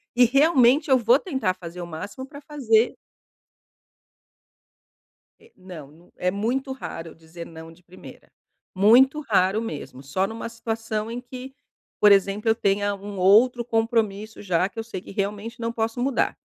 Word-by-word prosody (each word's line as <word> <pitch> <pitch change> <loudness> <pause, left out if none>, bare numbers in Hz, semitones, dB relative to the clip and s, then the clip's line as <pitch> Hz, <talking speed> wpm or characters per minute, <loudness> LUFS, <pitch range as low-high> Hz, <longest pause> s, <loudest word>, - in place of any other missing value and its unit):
E 245 - +6
realmente 275 +1 +4
eu 260 - +7
vou 240 +4 +4
tentar 265 - -1
fazer 175 0 -10
o - - -5
máximo 200 +11 -7
pra 285 +1 -12
fazer. 245 -6 +1 2.4
É, - - -22
não, 180 -6 -11
não 170 +3 -22
é 180 0 0
muito 245 +7 -2
raro 165 -10 -7
eu - - -13
dizer 165 +1 -11
"não" 160 0 -11
de 175 +2 -20
primeira, 180 +1 -14 0.5
muito 255 +9 +5
raro 205 -4 +1
mesmo, 140 - -7
só 140 +8 -1
numa 225 +3 -6
situação 225 -1 -4
em 245 +1 -5
que, 255 +1 -10 0.5
por 210 -1 +6
exemplo, 200 +3 +2
eu 220 - +4
tenha 205 -1 0
um 200 0 -9
outro 235 +6 +5
compromisso 225 -2 -1
já, 185 -2 +1
que 225 - -10
eu - - -3
sei 220 -5 -7
que - - -12
realmente 205 +4 -4
não 230 0 -2
posso 225 +1 -3
mudar, 265 -1 0
220 Hz, 165 wpm, -24 LUFS, 185-245 Hz, 2.4 s, eu